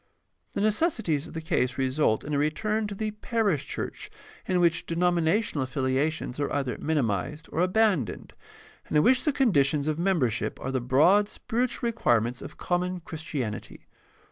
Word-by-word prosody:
The - - -2
necessities 215 - +1
of - - -12
the 160 - -3
case 145 -6 0
result 130 -3 +1
in 150 - -5
a - - +2
return 210 +9 0
to 205 - -6
the 215 +1 -2
parish 210 - -1
church - - -5 0.4
in 180 -1 +2
which 170 -1 +2
denominational 170 -1 +1
affiliations 130 +2 -1
are 145 - -1
either 135 -3 -1
minimized 145 - -1
or - - -3
abandoned, 185 - +1 0.5
and - - +1
in 150 - +5
which 255 0 +3
the 300 - +3
conditions 150 - +2
of 155 +1 -1
membership 160 - 0
are 130 - -4
the 130 -1 -1
broad 175 - +4
spiritual 240 +2 -2
requirements 120 - +1
of - - -9
common 180 0 -1
Christianity. 150 -9 -5
160 Hz, 155 wpm, -27 LUFS, 135-205 Hz, 0.5 s, in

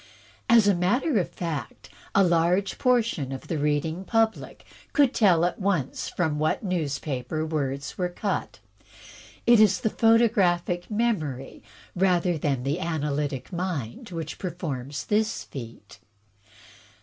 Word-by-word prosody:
As 230 -3 +6
a 200 - +5
matter 210 - +1
of 175 - -2
fact, 155 -9 -5 0.3
a 200 - +6
large 175 +3 +2
portion 230 - +1
of 135 - -7
the 160 - -1
reading 150 +4 0
public 225 +2 -1 0.3
could 280 -3 +4
tell 175 -6 +4
at 175 - -2
once 185 -9 -1
from 155 -4 -1
what 155 +7 0
newspaper 155 - -2
words 145 -2 -3
were 180 -1 0
cut. 200 +3 -3 0.9
It 235 -2 +6
is 200 -3 +4
the 220 - 0
photographic 200 -7 +2
memory 185 - -2 0.3
rather 180 -1 +2
than 140 -4 -1
the 140 +6 -1
analytic 150 -4 -2
mind 175 - -4
which 165 -3 -6
performs 150 -7 -4
this 215 +1 0
feat. 115 -5 -10
175 Hz, 125 wpm, -26 LUFS, 145-200 Hz, 0.9 s, As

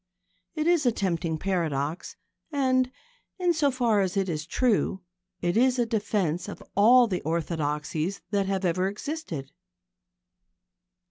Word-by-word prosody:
It 310 -1 -1
is 335 -5 +3
a - - +5
tempting 170 -6 -1
paradox, 165 -3 -2 0.4
and, 255 -3 +2 0.5
in 355 -2 +2
so 300 -3 +2
far 240 -5 +2
as 190 0 -1
it 195 -1 +1
is 155 -1 -3
true, 205 -4 +1 0.4
it 175 0 0
is 255 +2 +4
a 240 - +2
defence 205 -6 -1
of - - -8
all 240 +5 +7
the 185 -6 -2
orthodoxies 160 +2 -2
that 200 -2 +1
have 195 -1 -1
ever 185 +2 +1
existed. 205 - -5
195 Hz, 135 wpm, -27 LUFS, 170-250 Hz, 0.5 s, all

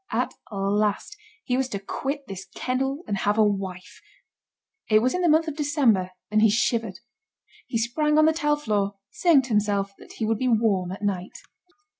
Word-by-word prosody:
At - - -1 0.2
last 205 - -1 0.3
he 250 - -1
was 260 0 0
to 200 - -4
quit 275 +8 -4
this 195 -3 -8
kennel 270 +5 -2
and 200 - -1
have 205 +2 0
a 220 - +6
wife. 195 -3 -3 0.9
It 215 - +6
was 250 +4 +2
in 365 - -1
the 350 - +3
month 320 +2 +4
of 310 - -3
December 275 - +2 0.2
and 215 0 +3
he 220 - +6
shivered. 225 -2 0 0.7
He 235 - -1
sprang 300 +7 +1
on 310 - +6
the 320 - +4
tile 295 -2 +1
floor, 205 -7 -1 0.2
saying 325 -7 +4
to 255 - -9
himself 205 -2 0
that - - -13
he 225 - -3
would 220 0 0
be 255 - 0
warm 215 -6 +2
at 195 +2 -7
night. 190 -3 -2
225 Hz, 190 wpm, -25 LUFS, 200-275 Hz, 0.9 s, a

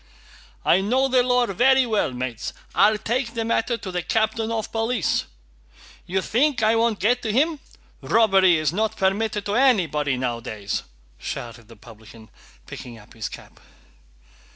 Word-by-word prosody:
"I 185 - +4
know 255 +7 +2
the 255 -1 +3
law 250 0 +2
very 260 +6 +3
well, 215 - 0
mates! 125 -2 -5 0.2
I'll 215 +1 +4
take 235 +3 -2
the 225 -1 -2
matter 230 +1 0
to 190 - -7
the 180 0 -2
captain 220 +3 0
of 225 -2 -3
police. 225 -3 0 0.8
You 190 +1 -1
think 260 0 +1
I 220 +1 +4
won't 225 -2 +1
get 245 +6 +2
to 220 - -2
him? 300 +6 +1 0.4
Robbery 195 -5 +4
is 155 0 0
not 220 +3 -1
permitted 205 +2 0
to 205 - -2
anybody 170 - +2
nowadays!" 115 -5 -3 0.4
shouted 120 - -7
the 115 - -14
publican, 110 0 -15 0.3
picking 120 -2 -9
up 105 - -17
his 110 -2 -5
cap. - - -13
210 Hz, 155 wpm, -23 LUFS, 145-235 Hz, 0.8 s, I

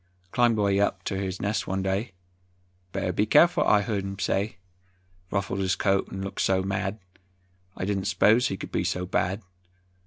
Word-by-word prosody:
Climbed 120 -2 +3
way 100 -1 +2
up 100 -1 0
ter 95 - -2
his 95 -1 -3
nest 105 +1 -1
one 95 0 -1
day, 95 +3 -1 0.8
"Better 90 - -2
be 105 +4 +1
careful," 170 +9 +5
I 105 - +4
heard 100 -3 -2
him 95 0 -5
say; 95 +1 -1 0.7
Ruffled 100 -1 -2
his 95 -1 +1
coat 95 -1 +1
'n 95 0 -5
looked 100 - -4
so 95 -1 +2
mad, 95 +1 -2 0.8
I - - -2
didn't 100 -1 -1
'spose 115 +4 +4
he 95 - -3
could - - -8
be - - 0
so 90 0 -1
bad. 95 +3 -1
95 Hz, 180 wpm, -26 LUFS, 95-105 Hz, 0.8 s, careful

